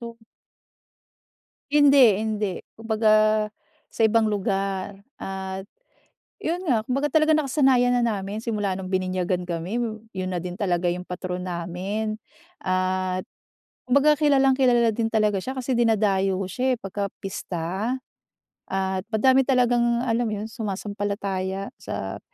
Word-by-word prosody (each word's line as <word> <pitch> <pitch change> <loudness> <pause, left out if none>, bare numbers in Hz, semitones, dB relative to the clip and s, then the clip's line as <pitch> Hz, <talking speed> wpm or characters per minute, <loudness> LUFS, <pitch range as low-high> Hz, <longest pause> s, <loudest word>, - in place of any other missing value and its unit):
o. 235 -1 -8 1.6
Hindi 280 -8 +6
hindi, 215 -2 -1 0.3
kumbaga 220 -1 +2 0.8
sa - - -11
ibang 225 0 +4
lugar. 195 -1 -2 0.2
At 190 0 -5 0.8
yun 340 +3 -1
nga, 230 -5 +2
kumbaga 275 +5 0
talagang 310 0 +3
nakasanayan 260 -4 +3
na 240 - +2
namin 210 -1 -2
simula 205 -4 -1
nung 185 0 -6
bininyagan 185 -1 -1
kami, 175 +7 -3 0.3
yun 185 -1 -4
na 175 - -3
din 180 +1 -6
talaga 175 -3 +1
yung 180 +1 -5
patron 180 0 -4
namin. 185 +5 -3 0.4
At 185 0 -1 0.6
kumbaga, 285 +4 +5
kilalang-kilala 265 -5 +4
din 230 -1 0
talaga 210 -2 +2
siya 260 - -4
kasi 255 0 -1
dinadayo 195 -4 +2
siya, 255 +6 0
eh, - - -52
pagka-pista 195 +1 -4 0.7
at 190 -1 -1
madami 260 +4 +4
talagang, 245 -2 +2
alam 235 0 +1
mo 215 - -3
yun 220 - -5
sumasampalataya 200 -2 -3
sa - - -5
210 Hz, 120 wpm, -24 LUFS, 190-240 Hz, 1.6 s, Hindi